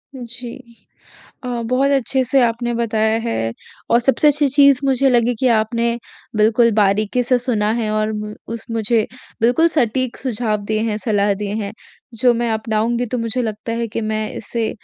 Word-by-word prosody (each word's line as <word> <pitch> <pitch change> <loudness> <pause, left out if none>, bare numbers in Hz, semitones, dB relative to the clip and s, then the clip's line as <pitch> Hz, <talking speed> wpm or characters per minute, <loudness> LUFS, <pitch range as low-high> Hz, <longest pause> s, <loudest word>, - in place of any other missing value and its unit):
जी। 245 -1 -7 0.9
अ, 250 - -5 0.2
बहुत 260 +4 +1
अच्छे 265 -1 +1
से 260 +2 +2
आपने 240 0 0
बताया 220 -1 +1
है 225 - -2 0.4
और 235 - +5
सबसे 270 +4 +3
अच्छी 295 0 +4
चीज़ 280 -1 +5
मुझे 270 0 +3
लगी 240 0 +3
कि 260 - +2
आपने 235 +2 0 0.4
बिल्कुल 225 +2 +4
बारीकी 210 +3 +2
से 250 +1 +2
सुना 225 -4 0
है 225 -2 -1
और 215 0 0 0.4
उस 230 -1 -6
मुझे 225 0 +1 0.4
बिल्कुल 245 +8 +4
सटीक 255 -5 0
सुझाव 230 -4 -1
दिए 215 +1 -1
हैं, 210 - -1
सलाह 205 -2 +1
दिए 205 0 -4
हैं। 200 - -5 0.5
जो 245 +2 +4
मैं 235 0 -1
अपनाऊँगी 220 +2 -1
तो 250 +2 -3
मुझे 230 +2 -1
लगता 220 0 -4
है 235 0 -2
कि 230 - -4
मैं 215 0 -2
इससे 230 -2 -3
230 Hz, 170 wpm, -19 LUFS, 215-250 Hz, 0.9 s, और